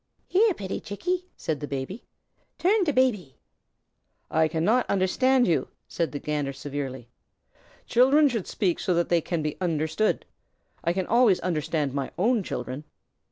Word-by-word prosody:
"Here, 405 0 +3
pitty 190 -1 -4
Chickie!" 360 - -3
said 155 -3 -2
the 145 - -5
Baby. 140 - -5 0.5
"Tum 380 +4 +3
to 300 - +2
Baby." 230 - +1 0.9
"I 160 0 +3
cannot 185 +11 +1
understand 250 +7 +3
you," 165 - +1 0.2
said 170 -2 -2
the 145 - -4
Gander, 145 -1 -2
severely. 135 -3 -5 0.8
"Children 270 +5 +5
should 230 -8 -2
speak 185 -6 0
so 185 -4 0
that 170 0 +1
they 170 -1 +3
can 165 -1 -2
be 150 -1 -3
understood. 160 +4 0 0.6
I 170 - +2
can 185 +1 -1
always 230 -4 +4
understand 155 -4 -1
my 140 -2 -2
own 225 +4 +2
children." 130 -4 -5
180 Hz, 150 wpm, -26 LUFS, 150-245 Hz, 0.9 s, Children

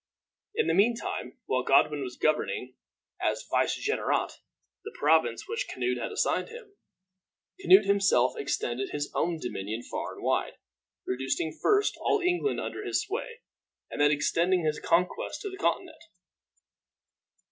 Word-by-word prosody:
In 455 -1 +2
the - - +1
mean 225 +4 +4
time, 230 - -5
while 130 - +1
Godwin 140 +2 +3
was 125 -2 -6
governing, 130 -4 0 0.5
as - - -1
vicegerent, 430 - +1 0.5
the 435 - -9
province - - +2
which 460 +2 -3
Canute 370 - -1
had - - -4
assigned 430 - 0
him, 455 -3 -12 0.8
Canute 190 +4 +6
himself 195 -11 +3
extended 130 -2 -2
his 145 0 -3
own 170 -1 0
dominion 110 -4 -5
far - - -5
and - - -11
wide, - - 0 0.5
reducing 135 +5 -1
first 415 0 +2
all 420 - +1
England 360 +3 0
under - - -5
his - - 0
sway, 460 +3 -5 0.5
and - - -3
then 145 - +6
extending 170 +4 +1
his 155 -1 0
conquests 180 +2 0
to 405 - -4
the 380 - -8
Continent. 400 - -1
180 Hz, 140 wpm, -28 LUFS, -, 0.8 s, Canute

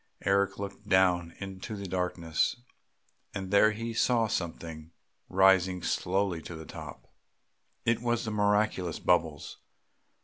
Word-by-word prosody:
Eric 100 +1 +2
looked 100 +1 -7
down 90 -2 +3
into 95 +2 -6
the 100 -1 -6
darkness, 90 -3 0 0.8
and 95 -1 -4
there 100 +1 +6
he 115 +2 -4
saw 115 0 +3
something 80 -5 -4 0.4
rising 95 -1 +4
slowly 95 -2 0
to 85 - -8
the 80 0 -8
top.... - - -9 0.8
It 115 0 +2
was 120 -1 0
the 110 - -2
miraculous 105 -4 +1
bubbles. 80 -4 0
95 Hz, 125 wpm, -29 LUFS, 90-105 Hz, 0.8 s, there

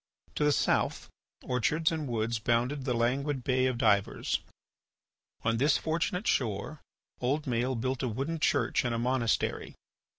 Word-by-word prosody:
To - - -1
the 150 - +4
south, - - +1 0.3
orchards 150 +7 +1
and 155 -3 -3
woods 115 -1 -1
bounded 120 +5 0
the 125 -3 0
languid 130 +3 0
Bay 130 0 +2
of 130 -2 -1
Divers. 100 -4 +1 1.0
On 115 0 +1
this 140 +4 +3
fortunate 165 +4 -1
shore 115 +5 -1 0.4
old 140 +5 0
Maël 125 -1 -1
built 130 +1 -1
a 130 - 0
wooden 140 +9 -3
church - - +2
and 120 -2 -1
a - - -1
monastery. 120 -1 0
130 Hz, 145 wpm, -30 LUFS, 115-145 Hz, 1.0 s, the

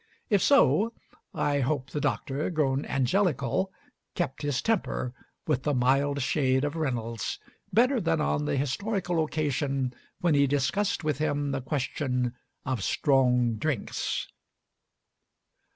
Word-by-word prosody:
If 200 -3 +4
so, 230 -5 +4 0.4
I 145 -1 0
hope 135 0 -1
the 150 - -2
Doctor, 140 +2 -1
grown 145 -5 0
"angelical," 140 - +1 0.4
kept 170 -8 -2
his 145 -3 0
temper 180 - -1 0.3
with 145 -5 +1
the 145 0 0
mild 135 +2 +2
shade 130 -1 +2
of 145 +2 -1
Reynolds 115 - -2 0.3
better 250 +2 +3
than 165 -1 +1
on 150 0 0
the 145 -1 0
historical 175 - 0
occasion 140 -4 -1 0.3
when 175 -3 +2
he 140 -1 +4
discussed 145 +9 0
with 150 -3 -1
him 145 -2 0
the 135 -1 -2
question 125 -2 -1 0.3
of 130 -6 -1
"strong 125 - +2
drinks." 140 -2 -2
145 Hz, 125 wpm, -28 LUFS, 130-155 Hz, 0.4 s, If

